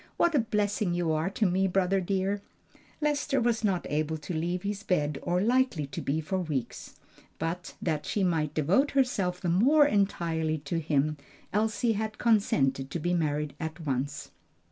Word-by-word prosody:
"What 345 - +3
a 290 - +4
blessing 210 -4 0
you 175 -2 0
are 155 +3 0
to 210 +2 0
me, 190 +1 +2
brother 190 +1 +1
dear!" 195 +2 -1 0.6
Lester 290 -2 +1
was 235 -1 +1
not 190 -4 +1
able 155 +1 -1
to 155 +3 -6
leave 175 +3 -2
his 200 0 -3
bed 150 -8 0
or 175 +1 0
likely 240 - +2
to 140 - -6
be 150 +3 -1
for 185 +5 -2
weeks, 150 -8 -4 0.4
but 170 +3 -4
that 155 -4 -1
she 205 - 0
might 160 -4 0
devote 185 - +3
herself 200 -10 +1
the 180 - -3
more 260 - +5
entirely 170 - 0
to 150 +3 -3
him 150 -1 0 0.4
Elsie 220 +2 +1
had 215 0 -3
consented 135 - +2
to 170 - -3
be 175 +2 -1
married 150 -3 0
at 160 +1 -5
once. 135 0 -3
180 Hz, 170 wpm, -28 LUFS, 155-210 Hz, 0.6 s, more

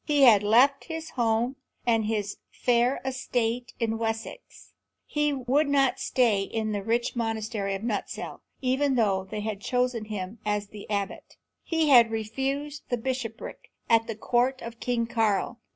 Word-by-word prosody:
He 290 -2 +3
had 220 -6 +8
left 250 +7 +4
his 320 -1 -6
home 235 +1 0 0.3
and 225 -3 +2
his 210 -2 -2
fair 245 +1 +2
estate 245 -2 -2
in 225 -1 -1
Wessex; 225 - -5 0.3
he 295 0 0
would 275 +2 +1
not 275 -3 +3
stay 230 -6 +2
in 215 +2 -2
the 205 -1 -2
rich 235 +5 0
monastery 220 -3 -2
of 195 - -6
Nutescelle, 220 -4 -4 0.2
even 265 +1 +1
though 195 -5 +2
they 215 0 -4
had 210 -1 -4
chosen 250 -1 0
him 210 0 -5
as 210 -1 -1
the 210 0 -11
abbot; 200 -2 -3 0.3
he 325 -2 +1
had 240 -4 +8
refused 270 +7 -3
a 245 - +2
bishopric 245 -2 -5 0.2
at 225 0 +4
the 225 - -4
court 245 +4 +1
of 230 0 -8
King 240 -2 0
Karl. 225 0 0
230 Hz, 155 wpm, -27 LUFS, 215-260 Hz, 0.3 s, had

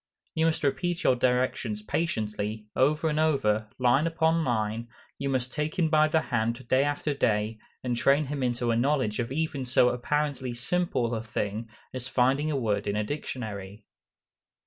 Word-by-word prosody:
You 160 +1 +2
must 160 0 0
repeat 170 +5 0
your 130 - +4
directions 125 -4 0
patiently, 105 -6 -2
over 150 +4 +2
and 155 0 0
over, 110 -9 +2
"line 130 +5 +3
upon 165 0 +2
line;" 115 -2 -1 0.3
you 140 0 -1
must 130 -1 -1
take 150 +4 -2
him 165 -3 +2
by 155 -1 +5
the 160 +1 +2
hand 120 -1 -2
day 130 +2 +4
after 145 +1 -1
day, 110 -4 0 0.2
and 125 -1 0
train 140 +5 +3
him 140 0 -4
into 120 -1 0
a - - +2
knowledge 125 -3 +1
of 120 0 -2
even 145 -2 -1
so 125 -1 +4
apparently 130 0 -1
simple 125 -2 0
a 110 - -1
thing 110 0 -3 0.2
as 125 -1 -4
finding 135 +4 +2
a 150 - 0
word 105 -5 0
in 100 - 0
a 105 - +1
dictionary. 105 -6 -5
125 Hz, 170 wpm, -28 LUFS, 115-150 Hz, 0.3 s, by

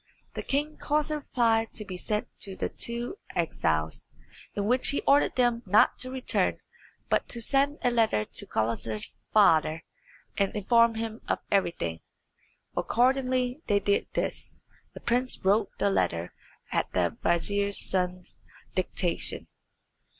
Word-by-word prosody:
The - - -4
king 295 +2 -2
caused 300 +1 0
a 305 - 0
reply 230 -5 +1
to 215 - -3
be 185 - -6
sent 210 +3 -2
to 195 -2 0
the - - -2
two 240 - -2 0.2
exiles, 80 - -1 0.5
in 200 - -1
which 250 +4 +3
he 280 - +1
ordered 285 +1 +3
them 240 -2 +2
not 205 +3 +4
to 255 - 0
return, 260 0 0 0.5
but - - +1
to 235 - -2
send 280 +5 +1
a 245 - +3
letter 220 - +2
to - - +1
Gulizar's 110 -1 -2
father, 165 -6 +4 0.6
and 200 +2 +1
inform 230 +2 +4
him 225 0 -4
of - - +1
everything. 125 - 0 0.8
Accordingly 255 +2 +1
they 205 -1 +3
did 200 0 +1
this; - - -3 0.4
the - - -7
prince 250 +2 0
wrote 200 +3 +3
the 200 - +2
letter 85 - 0 0.4
at - - 0
the 85 -2 +1
vizier's 200 +4 +1
son's 180 -1 -2 0.3
dictation. 180 -1 -1
215 Hz, 140 wpm, -28 LUFS, 180-250 Hz, 0.8 s, not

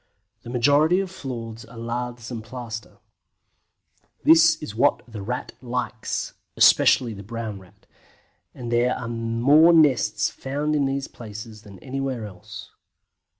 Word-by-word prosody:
The - - -10
majority 145 +8 +3
of 195 -2 -3
floors 115 -9 -7
are 115 +1 -14
laths 120 +1 -5
and 115 -3 -5
plaster. 115 -2 -8 1.3
This 165 0 +6
is 150 -10 -8
what 135 +6 +2
the 110 -3 -8
Rat 125 +5 -4
likes, 125 -2 -3 0.2
especially 120 -3 +5
the 100 - -9
Brown 110 -1 -6
Rat, 95 +2 -20 0.7
and 120 -2 -7
there 120 +1 +2
are 120 - -6
more 120 +8 +4
nests 115 -10 +3
found 145 +3 -2
in 145 -2 +2
these 135 0 -2
places 110 -1 -10
than 100 -3 -13
anywhere 135 -3 -4
else. 105 +2 -11
120 Hz, 135 wpm, -24 LUFS, 110-135 Hz, 1.3 s, This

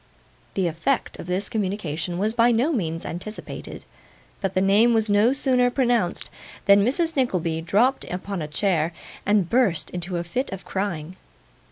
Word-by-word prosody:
The 190 - +1
effect 170 - -1
of - - -7
this 185 +2 0
communication 185 -5 -2
was 210 +4 0
by 235 +1 +4
no 240 +7 +2
means 165 - -2
anticipated; 200 +6 -7 0.6
but 195 -2 -2
the - - +4
name 210 +5 +4
was 220 -1 +1
no 210 +4 +4
sooner 255 -2 +2
pronounced, 240 -8 0 0.3
than 200 0 +6
Mrs. 320 - +1
Nickleby 180 - 0
dropped 220 +11 +2
upon 185 0 -4
a 150 - -3
chair, 165 0 0 0.3
and 205 -4 +3
burst 230 -6 +1
into 180 0 -3
a 170 - -2
fit 245 +11 -3
of 190 -1 -7
crying. 185 -3 -3
200 Hz, 160 wpm, -24 LUFS, 175-235 Hz, 0.6 s, than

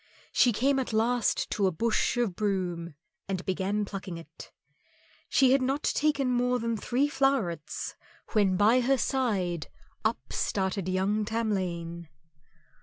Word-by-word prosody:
She 245 - +4
came 270 +5 +2
at 255 -3 -3
last 230 +1 +1
to 200 -2 +2
a - - +1
bush 225 +7 0
of 230 -7 0
broom 180 -6 -2 0.3
and 190 -2 -3
began 195 +2 -1
plucking 195 -3 -6
it. 165 - -12 0.8
She 265 -2 +4
had 270 0 +4
not 270 +3 0
taken 285 -4 +1
more 250 0 +2
than 230 -1 -1
three 250 +6 0
flowerets 225 - -1 0.4
when 200 -4 +3
by 220 +5 +5
her 265 +2 +2
side 195 - 0 0.4
up 220 +1 -2
started 190 -1 -1
young 195 +3 +1
Tamlane. 185 -7 -2
210 Hz, 135 wpm, -28 LUFS, 185-250 Hz, 0.8 s, by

